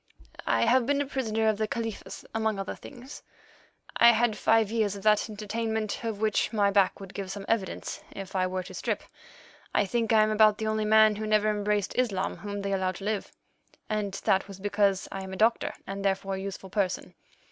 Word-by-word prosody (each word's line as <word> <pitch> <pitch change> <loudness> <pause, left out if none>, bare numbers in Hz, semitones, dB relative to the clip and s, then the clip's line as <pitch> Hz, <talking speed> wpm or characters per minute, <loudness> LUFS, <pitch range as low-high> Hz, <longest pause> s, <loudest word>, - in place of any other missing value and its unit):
"I - - +3
have 245 +1 +3
been 285 0 +2
a 285 - 0
prisoner 225 -5 -1
of 215 -1 +1
the 215 - +1
Khalifa's 225 -1 -5
among 220 -2 0
other 195 -1 -4
things. 260 0 -11 0.8
I 235 0 +8
had 230 -1 +2
five 220 -1 +3
years 215 -3 +1
of 200 - -9
that 215 +1 +3
entertainment 220 +1 -3
of 225 -3 -3
which 215 -1 +1
my 205 -3 +2
back 195 -2 +3
would 195 -1 -10
give 195 -2 -5
some 195 0 -6
evidence 205 -5 -2
if 195 0 -8
I 185 -1 +2
were 185 0 -3
to 185 +1 -11
strip. - - -2 0.7
I - - +4
think 230 +3 -1
I 220 -1 +6
am 215 - +1
about 215 -1 +5
the 220 - -3
only 215 0 0
man 215 0 +5
who 215 0 -3
never 215 0 +3
embraced 210 -1 0
Islam 210 -7 0
whom 205 -1 -5
they 200 - -2
allowed 185 -1 0
to 195 - -9
live, 210 0 -2 0.6
and 210 -2 -1
that 190 0 +2
was 195 -1 -10
because 200 -1 +1
I 195 - -4
am 190 0 -7
a - - -5
doctor, 225 +3 +2
and, 195 +1 -5
therefore, 195 0 0
a 190 - -3
useful 195 -1 -7
person. 195 -4 -1
210 Hz, 210 wpm, -28 LUFS, 195-220 Hz, 0.8 s, I